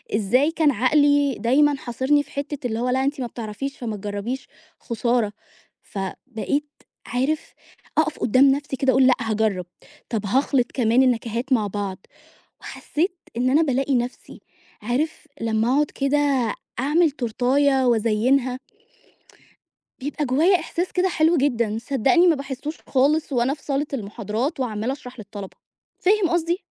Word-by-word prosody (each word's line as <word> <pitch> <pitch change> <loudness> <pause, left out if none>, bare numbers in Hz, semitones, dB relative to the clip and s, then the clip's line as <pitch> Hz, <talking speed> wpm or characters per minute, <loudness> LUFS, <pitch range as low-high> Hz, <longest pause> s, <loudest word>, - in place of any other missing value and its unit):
إزاي 250 +9 +2
كان 315 -3 +3
عقلي 285 +3 +3
دايمًا 280 +6 +3
حاصرني 260 +4 +1
في - - -20
حتّة 280 -2 -4
اللي 225 0 -3
هو 250 +1 0
لا 260 +1 +1
أنتِ 280 0 -1
ما 245 - -2
بتعرفيش 235 +5 -6
فمتجربيش 210 +2 -4 0.3
خسارة. 235 -2 0 0.5
فبقيت 240 +8 -4 0.4
عارف، 275 +5 -1 0.4
أقف 315 -1 +1
قدام 265 +4 +5
نفْسي 285 0 -2
كده 265 0 +2
أقول: 260 0 +5
"لأ، 255 - +6
هاجرب، 215 -5 0 0.4
طَب 220 -3 -2
هاخلط 255 +3 +1
كمان 245 +1 +3
النكهات 240 +1 0
مع 215 -4 +2
بعض". 200 -1 -4 0.6
وحسيت 350 +5 -3 0.2
إن 250 +2 +1
أنا 300 +5 +4
بالاقي 270 -1 +1
نفْسي. 245 0 -3 0.4
عارف 285 +8 -2
لما 225 0 0
أقعد 295 0 +2
كده 275 +1 0 0.6
أعمل 310 +4 +3
تورتاية 265 +1 +1
وأزينها 240 +3 +2 1.4
بيبقى 290 +2 -3
جوايا 325 +9 +3
إحساس 350 +2 -3
كده 370 +1 +2
حلو 330 0 +3
جدًا، 235 -6 +1
صدقني 280 +8 +3
ما 335 - +5
باحسهوش 280 +3 -5
خالص 285 +3 +2
وأنا 250 +2 +1
في 300 - -20
صالة 285 +1 -1
المحاضرات، 225 - -3
وعمّالة 230 0 -1
أشرح 255 -3 -10
للطلبة. 200 -2 -9 0.4
فاهم 395 -1 +2
قصدي؟ 345 +1 +1
260 Hz, 135 wpm, -23 LUFS, 230-290 Hz, 1.4 s, لأ